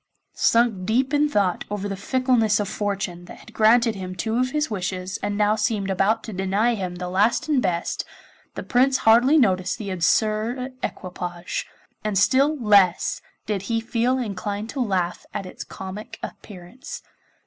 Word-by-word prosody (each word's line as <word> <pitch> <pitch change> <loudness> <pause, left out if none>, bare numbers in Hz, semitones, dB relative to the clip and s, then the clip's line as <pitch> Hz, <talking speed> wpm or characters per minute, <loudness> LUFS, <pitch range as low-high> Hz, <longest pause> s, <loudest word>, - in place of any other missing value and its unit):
Sunk 230 -5 +2
deep 260 +5 +1
in 295 +1 +3
thought 200 -8 +1
over 205 -1 -3
the 195 - -3
fickleness 230 0 +2
of 205 - -1
fortune 195 -4 -3
that - - -11
had 225 - -15
granted 230 +1 +4
him 185 -2 -6
two 220 +6 -1
of 255 0 +1
his 300 +3 0
wishes 185 -1 -4
and 205 0 -2
now 210 0 +3
seemed 210 -3 -1
about 205 +4 +1
to 220 - -7
deny 195 +5 +1
him 185 -5 -4
the 180 0 -5
last 205 - +2
and 290 -4 +2
best, 175 -4 -1 0.5
the - - -5
Prince 260 +1 +3
hardly 240 +7 +6
noticed 185 -9 +2
the 200 -3 -5
absurd 220 +8 0
equipage, 175 -1 -5 0.4
and 210 -2 -1
still 270 +10 +3
less 200 -7 +3 0.2
did 205 -2 -2
he 230 -1 +1
feel 240 +3 0
inclined 210 -2 -4
to 275 - -5
laugh 185 -7 -1
at 200 -2 -3
its 185 - -8
comic 190 +3 -8
appearance. 205 - -9
210 Hz, 165 wpm, -23 LUFS, 190-240 Hz, 0.5 s, hardly